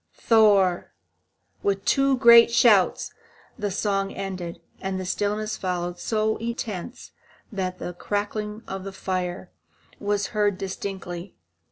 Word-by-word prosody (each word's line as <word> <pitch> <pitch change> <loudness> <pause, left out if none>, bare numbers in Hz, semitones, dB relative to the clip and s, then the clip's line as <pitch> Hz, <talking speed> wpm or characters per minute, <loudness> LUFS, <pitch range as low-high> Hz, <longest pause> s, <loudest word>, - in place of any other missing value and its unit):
Thor! 205 -6 +3 0.7
With 195 -1 -1
two 275 -1 +3
great 235 -2 +8
shouts 230 -5 +3 0.5
the 205 -1 -1
song 195 0 -1
ended, 185 -3 -5 0.2
and 190 0 -3
a 185 - -4
stillness 210 +3 -1
followed 175 -1 -3
so 220 +2 0
intense 230 -1 -5 0.4
that 185 -3 -3
the 180 - -5
crackling 210 +3 -3
of 190 0 -5
the 195 0 -7
fire 185 -1 -3 0.5
was 205 -1 0
heard 205 -2 +1
distinctly. 190 -2 -6
200 Hz, 120 wpm, -25 LUFS, 185-215 Hz, 0.7 s, great